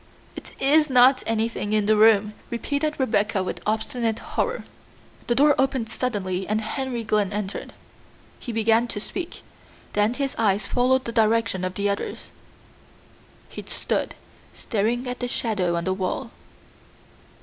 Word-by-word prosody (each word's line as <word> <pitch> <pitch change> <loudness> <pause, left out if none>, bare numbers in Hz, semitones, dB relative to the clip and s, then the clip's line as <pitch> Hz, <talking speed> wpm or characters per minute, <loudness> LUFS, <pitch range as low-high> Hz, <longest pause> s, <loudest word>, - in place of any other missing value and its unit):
"It - - -9
is 300 +2 +4
not 255 +1 +6
anything 225 -2 -1
in 215 -1 +2
the 215 +1 +4
room," 210 -1 +5 0.2
repeated 285 +6 -2
Rebecca 210 -5 +1
with 185 - -5
obstinate 220 +1 -1
horror. 480 0 -2 0.6
The 240 - +2
door 290 +3 +5
opened 265 -4 0
suddenly 195 -7 -2
and 215 +1 +1
Henry 240 +2 -3
Glynn 210 -3 +1
entered. 205 -1 -4 0.7
He 240 - -6
began 225 +1 +2
to 215 - -4
speak, 340 - -5 0.5
then 210 +3 +2
his 275 -1 -2
eyes 205 -2 +2
followed 255 +3 +2
the 235 - -3
direction 225 -4 +2
of 185 0 -3
the 200 0 0
others. 200 0 -4 1.2
He - - -8
stood - - -2 0.4
staring 235 +3 -1
at 250 0 -4
the 245 - -2
shadow 200 -8 -1
on 170 - -1
the 190 - 0
wall. 190 +4 -3
225 Hz, 145 wpm, -24 LUFS, 205-250 Hz, 1.2 s, not